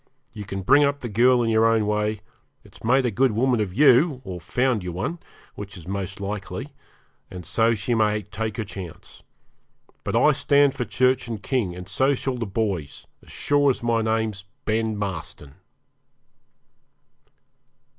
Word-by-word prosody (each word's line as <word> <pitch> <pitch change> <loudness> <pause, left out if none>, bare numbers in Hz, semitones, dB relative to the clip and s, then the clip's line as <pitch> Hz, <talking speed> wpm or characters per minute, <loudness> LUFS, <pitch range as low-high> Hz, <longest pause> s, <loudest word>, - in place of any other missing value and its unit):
You 105 - -7
can 95 0 -5
bring 140 +9 +5
up 140 0 0
the 120 - -4
girl 120 +3 +4
in 115 - 0
your 110 0 +4
own 115 -2 +2
way; 105 0 -1 0.4
it's - - -17
made 130 +3 +3
a 120 - +1
good 125 +3 +2
woman 125 +2 +2
of 105 -4 -1
you, 135 - +4
or 90 -2 -6
found 125 +5 0
you 90 0 -5
one, 120 - -4 0.3
which 100 -1 -9
is 85 - -12
most 100 +1 -4
likely, 100 - -5 0.6
and 90 -2 -9
so 115 +6 +2
she 110 +3 -2
may 105 -2 +1
take 105 +2 -5
her 110 - -2
chance. 95 -4 -10 0.8
But - - -2
I 150 - +5
stand 140 -1 +3
for 125 - -3
Church 130 0 +1
and 110 -3 -6
King, 110 -10 -1
and 90 0 -9
so 135 +9 +2
shall 130 -1 -3
the 115 - -3
boys, 95 -8 -3 0.2
as - - -16
sure 145 -1 +2
as 125 - -1
my 115 -1 +1
name's 110 -3 -1 0.2
Ben 110 -1 0
Marston.' 90 -8 -5
110 Hz, 170 wpm, -24 LUFS, 100-125 Hz, 0.8 s, bring